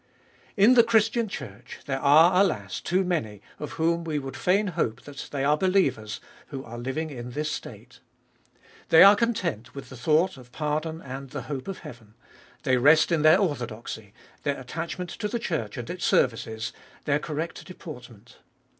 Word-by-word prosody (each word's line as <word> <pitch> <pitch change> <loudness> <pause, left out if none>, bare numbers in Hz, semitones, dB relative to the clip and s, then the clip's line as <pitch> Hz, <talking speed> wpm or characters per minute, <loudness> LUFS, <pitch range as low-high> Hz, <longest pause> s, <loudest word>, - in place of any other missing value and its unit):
In 210 +5 +7
the 240 -2 +7
Christian 225 0 +2
Church, 130 - -8
there 135 -1 -2
are, 160 +7 +6
alas, 100 - -1
too 185 +2 +1
many, 150 - -2 0.2
of 150 - -6
whom 170 +1 +1
we 160 -2 -2
would 135 -2 -5
fain 200 +3 +2
hope 115 -8 -2
that 145 -1 -8
they 140 -2 -2
are 145 +2 +4
believers, 185 - +1 0.3
who 135 -2 -6
are 120 -1 -8
living 150 +6 -3
in 120 -2 -7
this 150 +2 -2
state. - - -8 0.9
They 160 - +9
are 200 +1 +9
content 180 - -2
with 140 - -8
the 130 - -10
thought 155 +7 +2
of 125 -1 -15
pardon 155 +2 -3
and 135 0 -7
the - - -6
hope 135 -3 -5
of 195 - -5
heaven; 115 -3 -12 0.5
they 130 -3 +3
rest 150 +7 +5
in 165 -2 +2
their 155 +3 +7
orthodoxy, 120 - -3 0.3
their 145 -2 -2
attach 160 +8 -5
ment 180 -1 -5
to 210 - -3
the 235 - -2
Church 160 - -3
and 120 -1 -5
its 180 0 -6
services, 110 -2 0 0.3
their 145 0 +2
correct 155 +2 -4
deportment. 125 - -11
150 Hz, 175 wpm, -26 LUFS, 125-180 Hz, 0.9 s, They